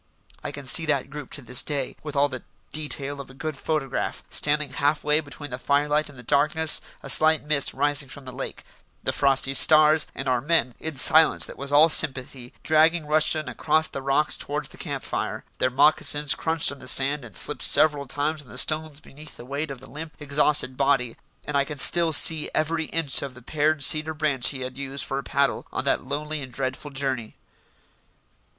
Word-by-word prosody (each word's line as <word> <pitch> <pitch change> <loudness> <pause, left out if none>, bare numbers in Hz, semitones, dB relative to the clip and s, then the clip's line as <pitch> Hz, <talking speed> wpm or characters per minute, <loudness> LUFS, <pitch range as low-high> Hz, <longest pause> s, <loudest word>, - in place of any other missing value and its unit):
I - - -4
can 145 -1 -9
see 160 +5 +3
that 140 -2 -1
group 145 -2 -8
to 145 - -7
this 125 +1 +2
day, 140 -4 -4
with 150 -1 -8
all 140 +1 +3
the 130 -3 -8 0.3
detail 145 -2 -3
of 135 - -13
a 130 - -15
good 155 +2 -5
photograph: 145 -2 -3
standing 150 -1 0
half 145 +2 0
way 150 +1 +2
between 145 -1 -9
the 125 - -6
firelight 150 +2 0
and 140 - -15
the 125 - -12
darkness, 150 +4 +2 0.2
a - - -8
slight 155 0 +4
mist 150 -2 0
rising 145 0 -1
from 140 0 -10
the 130 - -8
lake, 130 +2 -7 0.4
the - - -1
frosty 135 -1 +1
stars, 155 +2 +6
and 140 - -5
our 125 -2 +1
men, 145 -4 +1
in 160 -3 -6
silence 160 +3 +4
that - - -10
was 140 +1 -5
all 150 +3 +6
sympathy, 130 -4 0
dragging 160 +1 +2
Rushton 155 0 0
across 155 +5 0
the 135 - -7
rocks 140 +3 0
towards 145 0 -3
the - - -15
camp - - -5
fire. - - -4 0.2
Their 130 - +1
moccasins 145 +2 +3
crunched 160 -2 0
on 140 - -10
the - - -11
sand 140 +2 +2
and 110 -6 -7
slipped - - +3
several 145 -2 +3
times 145 +4 -1
on 140 - -17
the 125 - -11
stones 155 +1 0
beneath 150 0 -14
the 120 - -11
weight 140 +4 -4
of 135 -2 -8
the 135 - -13
limp, 155 +3 -9
exhausted 145 -2 0
body, 135 -3 0 0.3
and 150 - -5
I 140 - +3
can 145 +1 -8
still 170 +4 +4
see 155 +1 +6
every 160 +1 -1
inch 150 -5 -1
of 140 -2 -7
the 125 - -14
pared 155 +1 0
cedar 155 +2 +2
branch 145 -5 0
he 135 -2 -6
had 130 +1 -7
used 140 0 -4
for 135 - -3
a - - -7
paddle 140 +1 -1
on - - -4
that - - +1
lonely 150 +3 -4
and 130 -2 -9
dreadful 130 +3 -5
journey. 135 -5 -4
145 Hz, 205 wpm, -24 LUFS, 135-155 Hz, 0.4 s, stars